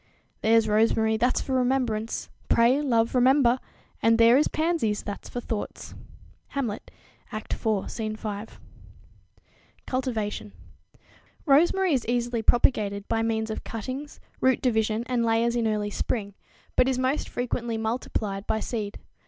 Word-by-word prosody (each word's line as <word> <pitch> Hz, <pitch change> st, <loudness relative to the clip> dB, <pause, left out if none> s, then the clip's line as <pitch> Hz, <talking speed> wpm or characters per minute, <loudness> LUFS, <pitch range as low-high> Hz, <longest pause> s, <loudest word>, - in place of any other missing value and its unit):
"There's 225 Hz, 0 st, +4 dB
rosemary, 220 Hz, +1 st, +3 dB
that's 240 Hz, +3 st, +1 dB
for 265 Hz, -, -3 dB
remembrance; 245 Hz, -4 st, 0 dB, 0.2 s
pray, 240 Hz, +5 st, +4 dB
love, 230 Hz, -5 st, +1 dB
remember: 255 Hz, 0 st, +4 dB, 0.4 s
And 225 Hz, 0 st, +4 dB
there 230 Hz, +1 st, +6 dB
is 290 Hz, -, +4 dB
pansies, 310 Hz, -10 st, 0 dB
that's 205 Hz, -, -6 dB
for 245 Hz, -, -4 dB
thoughts." 220 Hz, -3 st, -5 dB, 0.5 s
Hamlet, 245 Hz, -7 st, -4 dB, 0.4 s
Act 215 Hz, -1 st, -4 dB
iv, 215 Hz, -3 st, -1 dB
Scene 215 Hz, -2 st, -3 dB
5. 215 Hz, 0 st, -6 dB, 1.3 s
Cultivation. 225 Hz, -6 st, -3 dB, 0.9 s
Rosemary 345 Hz, +5 st, +4 dB
is 255 Hz, -4 st, +1 dB
easily 240 Hz, -1 st, 0 dB
propagated 210 Hz, -4 st, +2 dB
by 225 Hz, -, 0 dB
means 220 Hz, -1 st, -1 dB
of -, -, -5 dB
cuttings, 255 Hz, +6 st, -6 dB, 0.2 s
root 260 Hz, -1 st, +3 dB
division 220 Hz, -2 st, +1 dB
and 245 Hz, -2 st, 0 dB
layers 230 Hz, +1 st, +2 dB
in 235 Hz, -2 st, +1 dB
early 210 Hz, -1 st, -1 dB
spring, 200 Hz, -2 st, -2 dB, 0.4 s
but 250 Hz, -, +4 dB
is 260 Hz, -, 0 dB
most 260 Hz, +3 st, 0 dB
frequently 240 Hz, -2 st, -2 dB
multiplied 220 Hz, -3 st, -3 dB
by 220 Hz, -, 0 dB
seed. 215 Hz, -3 st, -4 dB
230 Hz, 135 wpm, -26 LUFS, 220-255 Hz, 1.3 s, there